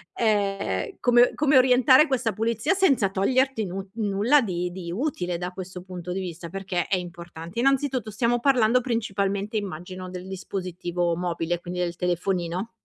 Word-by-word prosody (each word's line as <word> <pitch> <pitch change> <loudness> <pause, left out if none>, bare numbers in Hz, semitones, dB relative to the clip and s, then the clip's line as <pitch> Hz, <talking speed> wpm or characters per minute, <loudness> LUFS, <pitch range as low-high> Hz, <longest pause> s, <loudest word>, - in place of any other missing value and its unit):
ehm, 195 - 0
come 245 0 +5
come 295 -2 +3
orientare 260 +3 +6
questa 245 -5 0
pulizia 230 - 0
senza 275 - +3
toglierti 250 +4 +1
nu 190 +2 -5
nulla 220 +6 +3
di 180 -4 -2
di 175 -2 -6
utile 180 - -2
da 180 +1 -4
questo 185 -1 -8
punto 180 -1 -7
di 190 - -2
vista 170 -2 -6
perché 185 -2 -3
è 190 - +1
importante. 170 +2 -7
Innanzitutto, 265 -3 +1
stiamo 235 +3 +1
parlando, 250 -2 +4
principalmente, 205 -3 -2
immagino, 185 -1 -6
del 180 0 -7
dispositivo 180 -2 -3
mobile, 175 -1 -2
quindi 180 +1 -5
del 175 -1 -1
telefonino. 180 +3 -1
195 Hz, 150 wpm, -25 LUFS, 180-235 Hz, -, orientare